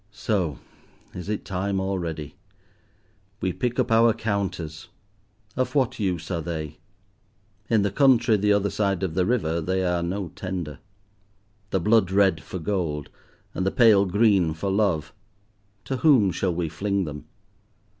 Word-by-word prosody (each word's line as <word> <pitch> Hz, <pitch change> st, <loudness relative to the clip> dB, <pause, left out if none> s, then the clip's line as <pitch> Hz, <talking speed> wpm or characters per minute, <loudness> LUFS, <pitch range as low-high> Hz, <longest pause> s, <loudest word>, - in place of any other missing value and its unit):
So! 100 Hz, -, -1 dB, 0.6 s
is 90 Hz, +2 st, -7 dB
it 105 Hz, -, -3 dB
time 95 Hz, +1 st, -2 dB
already? 85 Hz, -6 st, -3 dB, 1.1 s
We 95 Hz, -, -1 dB
pick 120 Hz, +7 st, -2 dB
up 125 Hz, -2 st, +1 dB
our 115 Hz, 0 st, +5 dB
counters. 100 Hz, -8 st, -3 dB, 0.7 s
Of 130 Hz, +3 st, -1 dB
what 130 Hz, -3 st, +1 dB
use 90 Hz, -4 st, -2 dB
are 85 Hz, -2 st, -1 dB
they? 80 Hz, -2 st, -5 dB, 0.9 s
In 110 Hz, -3 st, +3 dB
the 100 Hz, -, 0 dB
country 130 Hz, -4 st, +4 dB
the 105 Hz, 0 st, +2 dB
other 100 Hz, 0 st, +2 dB
side 100 Hz, -3 st, 0 dB
of 90 Hz, -4 st, -1 dB
the 90 Hz, +1 st, +1 dB
river 85 Hz, -9 st, 0 dB
they 95 Hz, +3 st, -1 dB
are 90 Hz, -1 st, 0 dB
no 90 Hz, +1 st, -3 dB
tender. 90 Hz, -5 st, -5 dB, 0.9 s
The 95 Hz, -, 0 dB
blood 105 Hz, +1 st, +3 dB
red 95 Hz, -5 st, +3 dB
for 95 Hz, -, -7 dB
gold, 80 Hz, -5 st, -2 dB, 0.4 s
and -, -, -2 dB
the 95 Hz, -, +2 dB
pale 105 Hz, -3 st, +5 dB
green 95 Hz, -5 st, +3 dB
for 95 Hz, +4 st, -2 dB
love, 90 Hz, -7 st, 0 dB, 0.7 s
to 135 Hz, -, -2 dB
whom 125 Hz, -, +4 dB
shall 90 Hz, -1 st, -1 dB
we 85 Hz, -1 st, -1 dB
fling 100 Hz, +5 st, -1 dB
them? 75 Hz, -1 st, -8 dB
95 Hz, 150 wpm, -25 LUFS, 85-105 Hz, 1.1 s, our